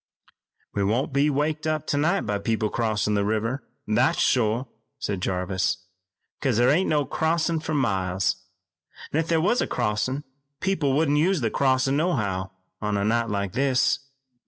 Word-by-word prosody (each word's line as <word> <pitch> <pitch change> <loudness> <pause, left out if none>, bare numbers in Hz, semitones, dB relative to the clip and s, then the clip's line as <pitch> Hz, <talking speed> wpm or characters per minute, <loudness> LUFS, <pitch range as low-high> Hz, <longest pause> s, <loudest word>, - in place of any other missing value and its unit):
"We 100 - 0
won't 115 +7 0
be 140 +2 +3
waked 150 +2 -1
up 155 -1 -1
tonight 160 +8 +1
by 105 -1 -2
people 110 0 -1
crossin' 105 -2 0
the 100 -1 +2
river, 110 +5 -1 0.2
that's 115 +5 +2
shore," 120 +1 +2 0.3
said 95 -3 -3
Jarvis, 95 +1 0 0.6
"'cause 130 -6 +1
thar 120 +1 +4
ain't 180 +6 +2
no 150 -2 +2
crossin' 160 +3 0
fur 155 0 -3
miles, 95 -8 0 0.8
an' 155 - +2
if 165 - -1
there 165 -1 +2
was 185 +9 +2
a - - 0
crossin' 125 +5 -1 0.4
people 170 -8 +1
wouldn't 150 0 +2
use 180 0 +2
that 115 -3 -1
crossin' 135 0 +2
nohow 105 - 0 0.3
on 105 -1 0
a 100 - 0
night 115 +1 +1
like 100 -2 -2
this. 135 0 +2
130 Hz, 160 wpm, -25 LUFS, 105-150 Hz, 0.8 s, thar